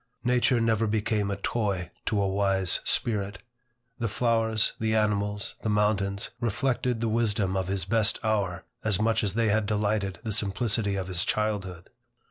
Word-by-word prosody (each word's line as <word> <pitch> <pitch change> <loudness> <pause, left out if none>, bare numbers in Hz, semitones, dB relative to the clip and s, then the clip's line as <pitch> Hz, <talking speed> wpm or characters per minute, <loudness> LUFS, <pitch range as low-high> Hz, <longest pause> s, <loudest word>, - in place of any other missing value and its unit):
Nature 125 0 +3
never 115 -1 +2
became 105 -1 0
a 100 - -1
toy 100 -5 -2 0.2
to 105 - +1
a 100 - +2
wise 95 -2 +2
spirit. 100 -3 0 0.6
The 115 - 0
flowers, 110 0 +1
the 110 0 +1
animals, 105 -1 0
the 110 - -2
mountains, 105 -2 0
reflected 120 0 0
the 115 - +1
wisdom 105 -4 +1
of 95 -1 -1
his 95 -2 -1
best 110 +1 +2
hour, 100 -5 0 0.2
as 105 -4 +2
much 110 +1 +2
as 100 -1 -1
they 115 -1 +2
had 105 0 +1
delighted 105 -2 0
the 110 - -3
simplicity 105 0 0
of 95 -1 -3
his 90 -2 +1
childhood. 100 -5 -2
105 Hz, 160 wpm, -27 LUFS, 100-110 Hz, 0.6 s, Nature